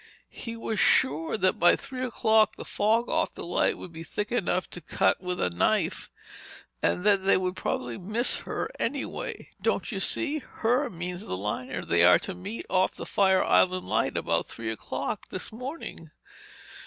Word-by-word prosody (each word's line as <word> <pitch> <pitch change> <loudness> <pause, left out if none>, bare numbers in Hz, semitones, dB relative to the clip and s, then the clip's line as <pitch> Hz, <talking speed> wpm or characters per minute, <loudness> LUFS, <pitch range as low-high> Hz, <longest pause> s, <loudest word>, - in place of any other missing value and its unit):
He 230 -1 -7
was 225 -2 -3
sure 155 +8 +3
that 185 -2 +1
by 175 - +6
three 255 -1 -6
o'clock 220 -3 +3
the - - -8
fog 225 +3 +1
off - - 0
the - - -6
light 175 - +1
would 175 - -9
be 160 - -8
thick 210 +6 -4
enough 185 -6 0
to 175 - -5
cut 160 - +1
with 180 -1 -3
a 90 - +1
knife—and 85 - -2
that 200 -2 +4
they 195 - +4
would 185 0 -2
probably 120 -8 -3
miss 215 +7 +2
her - - -4
anyway!—Don't 275 +4 -3
you - - -3
see? 310 -1 +2
'Her' 250 +1 0
means 180 +1 -5
the 90 - -3
liner 115 +6 -4
they 85 0 +3
are 90 +1 +8
to 195 - -4
meet 190 +5 -7
off 185 0 +1
the - - -6
Fire 190 -2 +3
Island 185 0 +3
Light - - 0
about - - 0
three 110 -1 -5
o'clock 110 - -4
this - - -5
morning!" 255 +8 -7
185 Hz, 170 wpm, -27 LUFS, 170-225 Hz, -, are